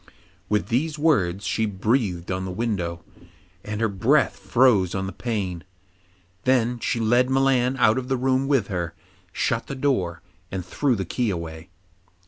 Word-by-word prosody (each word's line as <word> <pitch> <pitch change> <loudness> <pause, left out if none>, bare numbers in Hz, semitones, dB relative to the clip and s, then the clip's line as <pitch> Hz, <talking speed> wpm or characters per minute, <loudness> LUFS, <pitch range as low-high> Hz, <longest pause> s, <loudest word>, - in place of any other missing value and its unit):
With 105 +2 0
these 150 +6 0
words 100 - +1
she 110 -1 0
breathed 100 -3 0
on 95 0 -2
the 95 - -4
window, 90 -5 -2 0.6
and 105 0 -4
her 115 - +2
breath 115 +7 +2
froze 100 -2 +3
on 95 0 -1
the 95 - -4
pane. 95 -8 -3 0.8
Then 125 -2 +2
she 115 - -1
led 120 +3 +3
Milan 130 -1 +2
out 115 -1 +4
of 125 - -6
the 130 0 0
room 130 +1 +1
with 135 -7 +2
her, 85 -4 -4 0.4
shut 115 +5 -1
the 135 - -5
door, 95 -12 -1 0.3
and 95 -2 -4
threw 140 -4 +1
the 95 -3 -3
key 120 +6 -1
away. 85 -2 -5
110 Hz, 160 wpm, -24 LUFS, 95-130 Hz, 0.8 s, out